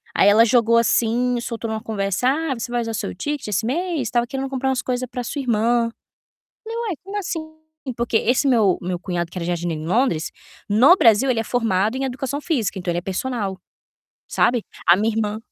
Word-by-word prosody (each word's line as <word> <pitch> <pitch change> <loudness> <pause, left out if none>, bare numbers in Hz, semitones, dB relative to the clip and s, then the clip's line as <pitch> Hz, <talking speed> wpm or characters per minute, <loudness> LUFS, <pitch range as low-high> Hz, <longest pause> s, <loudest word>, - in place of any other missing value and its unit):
Aí 200 - +5
ela 225 +3 +6
jogou 230 0 +4
assim, 240 +1 +2
soltou 230 -1 -4
numa 220 0 -3
conversa: 200 +1 -1
"Ah, 305 +1 0
você 235 +1 -5
vai 240 -1 0
usar 225 -1 -4
seu 210 - -3
ticket 290 +7 -4
esse 210 +1 -1
mês? 310 - -1
Tava 240 0 +1
querendo 270 0 -4
comprar 265 0 -1
umas 260 -1 0
coisas 255 0 -2
pra 250 0 -4
sua 285 +4 -4
irmã". 235 0 +1 0.7
Falei: 455 +1 -6
"Ué, 365 - -2
como 400 +2 -5
assim?", 350 -4 -3 0.6
porque 235 -1 +1
esse 255 +6 +1
meu 220 -8 +3
meu 180 0 -3
cunhado, 175 -2 -3
que - - -8
era 170 - -3
jardineiro 170 -2 -2
em - - -6
Londres, 185 -5 +1 0.4
no 250 - +7
Brasil, 230 +3 +4
ele 230 - 0
é - - -4
formado 220 -2 0
em 270 - -2
Educação 270 +3 -3
Física, 235 - -1
então, 180 -1 -2
ele 170 - -2
é - - -10
personal, 195 +1 -3 0.7
sabe. 240 -3 +2 0.2
A 175 - +8
minha 215 +2 0
irmã 215 -1 -1
230 Hz, 205 wpm, -21 LUFS, 205-260 Hz, 0.7 s, A